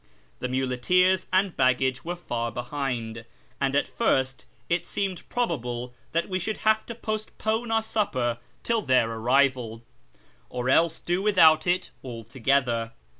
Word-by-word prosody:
The 125 - -2
nudcteers 135 +9 +2
and 185 0 +2
haggagc 130 0 +2
were 175 +2 -3
far 120 -9 -3
behind, 120 -2 -4 0.4
and 140 0 0
at 145 - +2
first 130 - 0 0.2
it 170 +1 +1
seemed 190 -3 -3
probalile 125 - -2 0.2
that 170 +1 0
we 185 -1 -1
should 215 +4 -2
have 220 0 +3
to 235 - -6
postpone 220 +1 -2
our 225 0 +2
supper 130 - -1 0.2
till 230 -1 +1
their 125 - +3
arrival, 120 -1 +1 0.7
or 125 +1 -1
else 165 +2 +4
do 175 +2 -1
without 170 -6 +5
it 180 +1 0
altogether. 120 -1 -1
140 Hz, 135 wpm, -26 LUFS, 125-185 Hz, 0.7 s, without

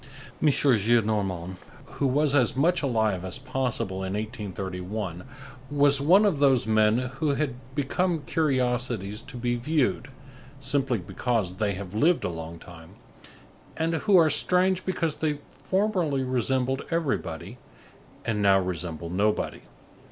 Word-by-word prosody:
M. - - +3
Gillenormand, 105 - +1 0.4
who 140 - +2
was 145 +2 +2
as 130 -5 +3
much 170 +7 +2
alive 110 - 0
as 95 -1 -4
possible 130 -7 -2
in 95 0 -3
1831, 95 -3 -5 0.4
was 145 -1 +4
one 185 +9 +5
of 185 -9 +1
those 135 -4 +4
men 110 0 +3
who 135 +4 -1
had 140 -2 -1 0.2
become 160 +3 0
curiosities 125 - -1
to 135 -1 -10
be 120 0 -1
viewed, 135 +1 0 0.5
simply 135 -3 0
because 100 0 -2
they 105 -1 0
have 95 0 -8
lived 160 +11 +2
a - - -1
long 80 0 -7
time, 85 -1 -14 0.8
and 165 +1 0
who 195 +4 +3
are 165 -2 +6
strange 185 +1 +2
because 165 -4 -1
they 150 -2 -1
formerly 185 -9 0
resembled 130 +1 0
everybody, 145 - -3 0.7
and 110 -2 -1
now 100 -1 +5
resemble 85 -2 -4
nobody. 105 +4 0
125 Hz, 130 wpm, -26 LUFS, 100-145 Hz, 0.8 s, are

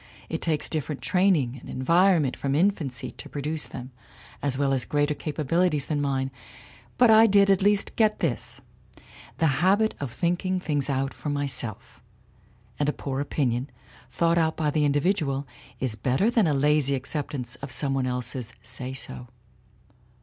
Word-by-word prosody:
It 160 - -3
takes 155 -3 0
different 150 -2 -3
training 175 -10 +2
and - - -12
environment 165 +1 +3
from 140 0 -1
infancy 145 -8 0
to - - -10
produce 150 +2 -3
them, 130 0 -8 0.5
as 140 -2 0
well 140 -1 +1
as 130 -2 +1
greater 145 0 +1
capabilities 155 +1 0
than 150 -2 -1
mine. 135 -1 -1 0.7
But 245 -2 +6
I 220 +1 +8
did 200 -1 +5
at 195 - +3
least 205 0 +2
get 215 -2 +3
this - - -2 0.8
the 165 - +2 0.2
habit 205 +4 +3
of 140 -4 -4
thinking 180 +5 0
things 145 -5 -1
out 135 0 -1
for 150 - -6
myself, 140 -6 -3 0.8
and 145 0 +2
a - - 0
poor 135 -1 -4
opinion, 135 -3 -1 0.4
thought 170 +6 +2
out 160 -1 +1
by 150 -2 +1
the 150 0 +2
individual, 145 -1 +1 0.3
is 130 -4 0
better 130 - +1
than 225 -7 +3
a 150 - +2
lazy 145 0 +3
acceptance 130 -2 -4
of 140 - -7
some 140 -2 0
one 130 -1 0
else's 125 -1 -4
say 130 0 -6
so. 125 -1 -5
145 Hz, 160 wpm, -26 LUFS, 135-170 Hz, 0.8 s, I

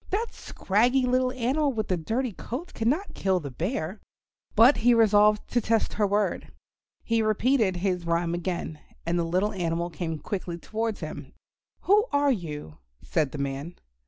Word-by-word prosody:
That 445 +4 -2
scraggy 245 +6 +1
little 255 0 +2
animal 265 +4 0
with 215 -3 -2
the 185 - +1
dirty 225 +9 -2
coat 255 - -7
cannot 280 - -1
kill 190 -1 +1
the 145 -5 -7
Bear." 180 - -3 0.6
But 235 +6 +7
he 240 +1 +4
resolved 210 -1 +4
to 240 - +1
test 225 0 +1
her 210 -1 +1
word. 205 +1 -1 0.5
He 230 -1 +1
repeated 215 -1 +2
his 180 -1 -1
rhyme 170 0 +1
again, 175 -3 -3 0.3
and 170 +1 0
the - - +1
little 185 +6 0
animal 170 -2 -2
came 160 0 -4
quickly 175 0 -4
towards 220 +4 -3
him. - - -7 0.5
"Who 420 +4 +4
are 285 0 +3
you?" 150 - -5 0.2
said 150 -4 0
the - - -6
man. 140 +4 -4
210 Hz, 160 wpm, -26 LUFS, 170-245 Hz, 0.6 s, But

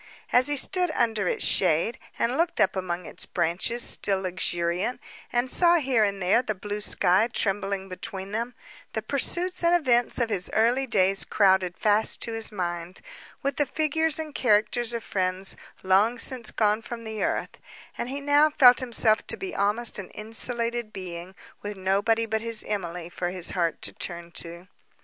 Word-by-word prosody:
As 250 +2 +5
he 290 0 0
stood 360 +5 +1
under 220 -5 0
its - - 0
shade, 180 +5 +2 0.2
and 240 +2 0
looked 335 +3 0
up 190 - +3
among 180 -2 -3
its - - -2
branches, 180 +8 0
still 195 -2 +3
luxuriant, 180 +3 -1 0.3
and 240 +1 +1
saw 345 -1 +4
here 260 -8 +2
and 200 -1 -1
there 195 +6 +3
the 215 -4 -3
blue 205 +2 -5
sky 195 +3 +3
trembling 195 -2 -1
between 190 +1 -7
them; 235 +3 -3 0.4
the - - -3
pursuits 360 +1 0
and 340 +1 +4
events 245 -8 +1
of 235 -3 0
his 185 -3 -2
early 245 +5 +2
days 195 -4 +2
crowded 190 -3 +2
fast 215 +1 +2
to 230 - -1
his 225 0 0
mind, 175 -2 -5 0.4
with 275 0 -1
the 290 - +2
figures 315 +2 +1
and 310 -2 -5
characters 235 0 +2
of 230 -1 -4
friends—long 190 +3 0
since 245 -1 +1
gone 215 0 +1
from 235 0 -8
the 220 -1 -4
earth; - - -3 0.4
and 240 - -4
he 275 +2 -4
now 290 +2 +4
felt 255 -5 +6
himself 230 -3 +1
to - - -2
be 380 0 -6
almost 210 +3 0
an 190 - -8
insulated 230 +1 -3
being, 180 -1 -8 0.3
with 205 -1 -6
nobody 200 +4 +1
but 220 0 -2
his 230 -1 -3
Emily 180 -4 -4
for 175 0 -4
his 180 -1 -4
heart 170 -3 -1
to - - -3
turn 170 -1 -6
to. 170 +2 -6
215 Hz, 175 wpm, -25 LUFS, 185-245 Hz, 0.4 s, felt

